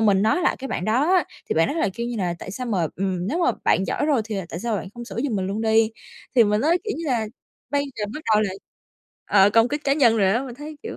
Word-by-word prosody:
mình 200 -3 +4
nói 220 +12 +2
lại - - +2
cái 270 0 -6
bạn 180 - -3
đó 255 +10 +2
á, 360 - +4 0.2
thì - - 0
bạn 165 +1 +3
đó - - -2
lại 315 -12 0
kêu 235 +2 -3
như 240 -1 -4
là: 180 -4 -1
"Tại - - -8
sao 250 +6 -5
mà, 185 -8 0
ừm, 185 -1 -2
nếu 320 - -1
mà 350 - +3
bạn 190 - +3
giỏi 295 - -1
rồi 275 -7 +2
thì, 215 -2 -4
à, 190 - -4
tại 170 - -6
sao 230 -2 -1
bạn 190 - -5
không 240 0 -7
sửa 195 -2 -9
giùm 235 -7 -1
mình 185 -1 -1
luôn 200 +3 -3
đi?". 220 0 +3 0.5
Thì 235 - +7
mình 210 +1 +1
nói, 335 +6 +3
kiểu 420 - -2
như 330 - -5
là, 235 -5 0 0.4
bây 285 0 +1
giờ 210 - -2
bắt 305 - -5
đầu 210 - +4
là 200 - -1 0.7
ờ, 200 0 +5
công 225 +3 +4
kích 295 +1 -2
cá 275 - +3
nhân 240 -6 +4
rồi 195 -3 +3
á, 240 +4 +1
mình 250 -3 -7
thấy 295 +2 -9
kiểu 450 - -6
225 Hz, 300 wpm, -23 LUFS, 200-275 Hz, 0.7 s, Thì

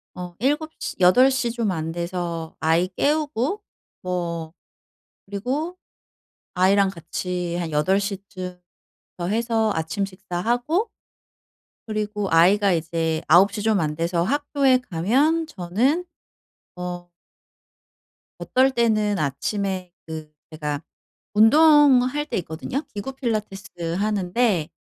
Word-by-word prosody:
어 180 -1 -7
7 295 +5 0
시 - - -4
8 245 +9 +6
시 250 -3 0
좀 230 -4 -1
안 160 -1 -3
돼서 170 -1 -4
아이 165 +3 +2
깨우고 295 - 0 0.4
뭐 170 -3 -3 0.7
그리고 265 - -3 0.8
아이랑 195 +2 +4
같이 175 0 -4
한 170 -3 -3
8 185 +7 +2
시쯤부터 185 -3 -6 0.7
해서 225 0 +1
아침 160 +5 -2
식사하고 235 - -1 1.0
그리고 210 -1 -2
아이가 190 +4 +5
이제 165 -1 -1
9 190 +5 +6
시 210 0 -4
좀 220 -3 +2
안 150 -1 -1
돼서 170 +1 0
학교에 280 - +2
가면 275 - +2
저는 250 - 0 0.7
어 175 0 -6 1.3
어떨 265 +1 +2
때는 215 -4 +1
아침에 185 +5 -2 0.2
그 155 -1 -7 0.2
제가 150 -2 -3 0.5
운동할 290 +3 +5
때 - - -3
있거든요. 170 - -4
기구 210 +6 -5
필라테스 200 -8 -4
하는데 200 -3 +1
195 Hz, 200 characters per minute, -23 LUFS, 175-245 Hz, 1.3 s, 8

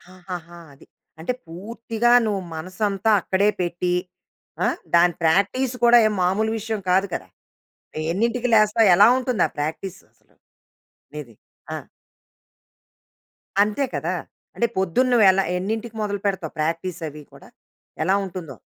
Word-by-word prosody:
ఆహాహా! 175 -2 -9
అది. 135 - -18 0.3
అంటే 175 +10 -2
పూర్తిగా 225 +6 -2
నువ్వు 205 -3 -1
మనసంతా 195 +5 -1
అక్కడే 200 +4 +2
పెట్టి 175 +1 -1 0.7
ఆ! - - +3 0.3
దాని 175 0 +5
ప్రాక్టీసు 200 +10 +2
కూడా 240 0 +7
ఏం 215 - -1
మామూలు 210 +5 +1
విషయం 220 0 -3
కాదు 190 +2 +3
కదా! - - -4 0.9
ఎన్నింటికి 235 +5 0
లేస్తావు? 215 0 +4
ఎలా - - +7
ఉంటుంది 250 -3 -1
ఆ - - -21
ప్రాక్టీససలు. 165 +5 -6 0.8
నీది? - - -8 0.4
ఆ! - - -2 1.9
అంతే 210 +7 +1
కదా! - - -2 0.4
అంటే 235 - +1
పొద్దున్న 190 +8 +1
నువ్వు 225 -4 +5
ఎలా 195 +1 +1
ఎన్నింటికి 220 +4 -4
మొదలు 205 -1 -2
పెడతావు? 185 -5 -3
ప్రాక్టీసవి 165 -2 -3
కూడా. - - -15 0.6
ఎలా 190 - +2
ఉంటుందో? 170 -7 -8
195 Hz, 120 wpm, -22 LUFS, 175-220 Hz, 1.9 s, కూడా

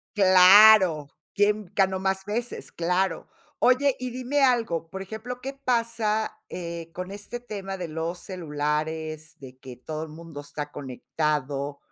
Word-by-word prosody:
¡Claro!, 185 -4 +7 0.3
quién 205 -2 +1
ganó 190 -1 +2
más 190 0 -1
veces, 235 +4 -4
claro. 180 +3 -1 0.3
Oye, 260 +2 +4
y 255 0 -3
dime 255 +4 -1
algo, 230 -11 +1
por 190 +3 -6
ejemplo, 220 +5 -7
¿qué 270 +2 -5
pasa, 230 -5 -1
eh, 170 -2 -6
con 180 +1 -6
este 205 +4 -7
tema 195 -5 -6
de 180 -3 -5
los 165 +3 -4
celulares, 155 -2 -3
de 130 -2 -12
que 130 -2 -10
todo 155 +5 -6
el 160 - -6
mundo 160 -1 -10
está 145 0 -7
conectado? 140 +1 -3
185 Hz, 140 wpm, -26 LUFS, 155-220 Hz, 0.3 s, Claro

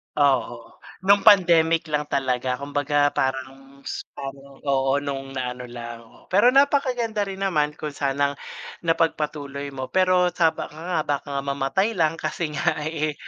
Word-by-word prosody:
Oo, 130 -5 0 0.3
nung 200 +1 +6
pandemic 170 -5 +5
lang 150 0 0
talaga, 130 -2 0
kumbaga, 145 +1 +1
parang 135 +1 -4
s - - -4 0.2
parang, 135 0 -8
oo, 135 -1 +2
nung 135 -1 -4
naano 125 -1 -4
lang. 120 -1 -10
Pero 205 +6 +6
napakaganda 255 -5 +2
rin 195 -1 -6
naman 150 -5 +1
kung 150 -1 -5
sanang 140 0 0 0.5
napagpatuloy 150 -4 -1
mo, 130 -2 -6
pero 185 -1 +3
sa 165 -2 +4
baka - - -6
nga, 170 -1 -2
baka 145 0 -2
nga - - 0
mamatay 140 +11 0
lang 165 -3 +1
kasi 165 -1 -3
nga 150 - 0
eh, 155 -1 -1
145 Hz, 145 wpm, -24 LUFS, 135-170 Hz, 0.5 s, nung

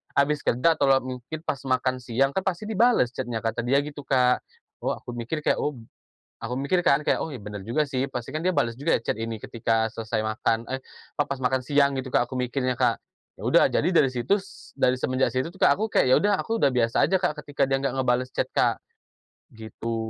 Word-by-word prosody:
abis 145 +1 +2
kerja 150 +8 +3
atau - - +1
lewat 135 -1 +3
mungkin, 130 +5 -6
pas 140 - -1
makan 130 -1 +1
siang 130 +3 +1
kan 190 - 0
pasti 190 0 -2
dibales 220 - +3
chat-nya." 120 -3 -3
Kata 115 +1 -1
dia 135 +4 +3
gitu, 145 0 -6
Kak. 125 -2 +2 0.4
Oh - - +1
aku 120 - -7
mikir 120 +7 -3
kayak, 150 - +1
oh 150 - 0
b 120 - -12 0.6
aku 125 +2 -4
mikir 140 +7 +1
kan 150 -3 +3
kayak, - - +2
"Oh, - - -3
ya - - -5
benar 105 -2 -8
juga 150 +7 +1
sih. 135 -1 -2
Pasti 120 -1 -5
kan 155 - -1
dia 185 - +1
bales 115 -1 +1
juga 150 +4 +2
ya - - -12
chat - - -1
ini 115 0 -3
ketika 115 -1 0
selesai 110 -1 -2
makan 110 +1 0
eh, 130 - -3 0.3
pa 145 - +1
pas 140 - -2
makan 130 0 0
siang." 140 +1 +2
Gitu, 130 -1 -4
Kak, - - +2
aku - - -11
mikirnya, 125 +1 -1
Kak. - - +3 0.4
Ya - - -9
udah, - - +5
jadi 165 - +1
dari 150 - +6
situs 190 - -2
dari 125 - +2
semenjak 130 -2 +1
situ 130 +3 -1
tuh, 190 - -22
Kak, - - +5
aku 220 - 0
kayak - - +3
ya - - +8
udah 205 0 +2
aku 225 0 -2
udah - - +4
biasa 115 -2 +3
aja, 190 - +1
Kak, 150 -3 -1
ketika 145 -1 -1
dia 135 0 +1
nggak 135 -1 -1
ngebales 125 -1 +1
chat, - - 0
Kak. - - +2 0.7
Gitu. 110 +1 -5
130 Hz, 235 wpm, -25 LUFS, 120-145 Hz, 0.7 s, ya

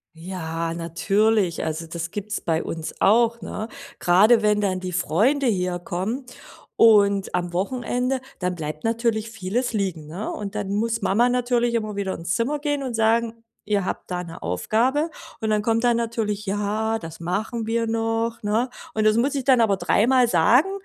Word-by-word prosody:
Ja, 165 -1 -4
natürlich, 195 +3 +1
also, 160 +1 -3
das 170 +1 -5
gibt's 210 +1 -4
bei 165 -2 0
uns 160 -1 -5
auch, 235 +2 +4
ne? 215 +1 -5 0.3
Grade 210 +6 +5
wenn 210 0 +3
dann 185 -2 0
die 185 -1 -5
Freunde 215 - +2
herkommen 185 +4 -2 0.5
und 200 -4 +4
am 175 -1 -1
Wochenende, 250 +6 -1 0.2
dann 180 -1 -1
bleibt 155 0 -6
natürlich 225 -1 0
vieles 225 +4 -2
liegen, 185 -8 -2
ne? 180 +8 -5
Und 200 -1 -6
dann 205 -2 -3
muss 225 +1 -1
Mama 220 +5 +3
natürlich 245 -1 +1
immer 215 -2 -1
wieder 195 -2 -2
ins 170 +1 -3
Zimmer 265 +6 0
gehen 290 -1 -1
und 250 -3 -4
sagen: 230 +1 +1 0.2
„Ihr 205 -2 +1
habt - - -5
da 180 0 -2
'ne 165 -1 -10
Aufgabe.“ 240 - 0 0.3
Und 220 -2 -1
dann 210 -1 +2
kommt 230 +2 +1
dann 240 -1 +4
natürlich: 220 -3 -2
„Ja, 210 +3 -1
das 165 -2 -9
machen 220 +6 -2
wir 230 0 0
noch“, 225 0 -1
ne? 220 +5 0 0.2
Und 215 - +1
das 215 0 +4
muss 270 +4 +1
ich 270 -2 -2
dann 255 -3 +5
aber 205 -3 +3
dreimal 235 +8 +3
sagen 240 - +4
215 Hz, 175 wpm, -23 LUFS, 180-235 Hz, 0.5 s, Grade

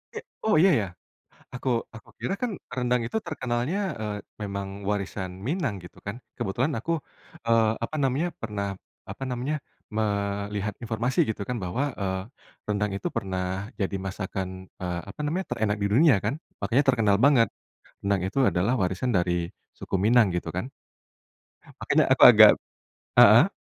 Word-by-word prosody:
E - - -2 0.3
oh, 220 - +4
iya 190 +2 +6
ya? 100 - -3 0.7
Aku 130 +1 -2 0.3
aku 110 - -13
kira - - -2
kan 250 -2 0 0.2
rendang 125 -1 +1
itu 220 - -2
terkenalnya, 130 +1 -2 0.2
eee, 105 -1 -3 0.3
memang 100 -1 -4 0.2
warisan 100 -2 -2 0.2
Minang, 145 - -1
gitu 90 - -13
kan. 100 - -4 0.2
Kebetulan 125 +10 -1
aku, 165 - -3 0.6
eee, 115 -1 +4
apa 135 - -4
namanya, 135 +6 +1
pernah, 105 -3 -3 0.4
apa - - -7
namanya, 125 +4 -2 0.3
melihat 100 -1 -2
informasi, 115 +3 -1
gitu 110 - -3
kan, 125 - -2
bahwa, 90 +10 -1
eee, 95 -2 -2 0.5
rendang 105 0 0
itu 100 - -3
pernah 95 +2 -3
jadi 100 -1 -1
masakan, 95 -1 -5
eee, 90 -1 -2
apa - - -12
namanya, 170 +6 -1
terenak 110 -2 0
di 100 - +1
dunia 125 +2 +5
kan, 105 +8 -2 0.2
makanya 115 +8 +2
terkenal 105 -5 +3
banget. 120 +1 +5 0.6
Rendang 100 -2 +1
itu 95 - -3
adalah 100 +8 +1
warisan 95 +3 0
dari 90 -2 +1 0.3
suku - - -6
Minang, 110 -3 +4
gitu 90 - -2
kan. 95 +9 -4 1.1
Makanya - - +3
aku - - +5
agak - - +10 0.7
heeh? - - +8
105 Hz, 150 wpm, -26 LUFS, 95-125 Hz, 1.1 s, agak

